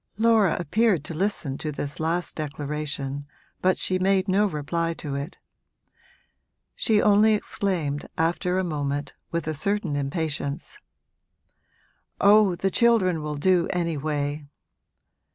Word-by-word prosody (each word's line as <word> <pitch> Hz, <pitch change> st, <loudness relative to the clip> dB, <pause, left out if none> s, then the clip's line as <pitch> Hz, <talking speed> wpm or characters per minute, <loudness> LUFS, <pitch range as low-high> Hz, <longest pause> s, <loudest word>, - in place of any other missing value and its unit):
Laura 220 Hz, -5 st, +4 dB
appeared 185 Hz, 0 st, +2 dB
to 155 Hz, -, -5 dB
listen 160 Hz, -6 st, -2 dB
to 155 Hz, -, -3 dB
this 145 Hz, +2 st, -4 dB
last 165 Hz, +2 st, -1 dB
declaration, 145 Hz, -2 st, -4 dB, 0.3 s
but 185 Hz, 0 st, +3 dB
she 185 Hz, 0 st, 0 dB
made 190 Hz, 0 st, +2 dB
no 200 Hz, +2 st, +3 dB
reply 165 Hz, +1 st, -2 dB
to 145 Hz, -3 st, -6 dB
it; 140 Hz, +5 st, -5 dB, 1.4 s
she 220 Hz, -3 st, +2 dB
only 210 Hz, +1 st, +5 dB
exclaimed 170 Hz, -9 st, -2 dB
after 175 Hz, +3 st, 0 dB
a 190 Hz, -, +1 dB
moment, 145 Hz, -3 st, -3 dB, 0.2 s
with 170 Hz, -2 st, -2 dB
a 155 Hz, -, -1 dB
certain 195 Hz, 0 st, -1 dB
impatience, 145 Hz, 0 st, -3 dB, 1.4 s
'Oh, 205 Hz, -2 st, +5 dB
the 195 Hz, +2 st, -1 dB
children 195 Hz, -9 st, +3 dB
will 150 Hz, 0 st, -4 dB
do 175 Hz, +3 st, +2 dB
anyway!' 150 Hz, -3 st, -2 dB
165 Hz, 120 wpm, -25 LUFS, 145-195 Hz, 1.4 s, only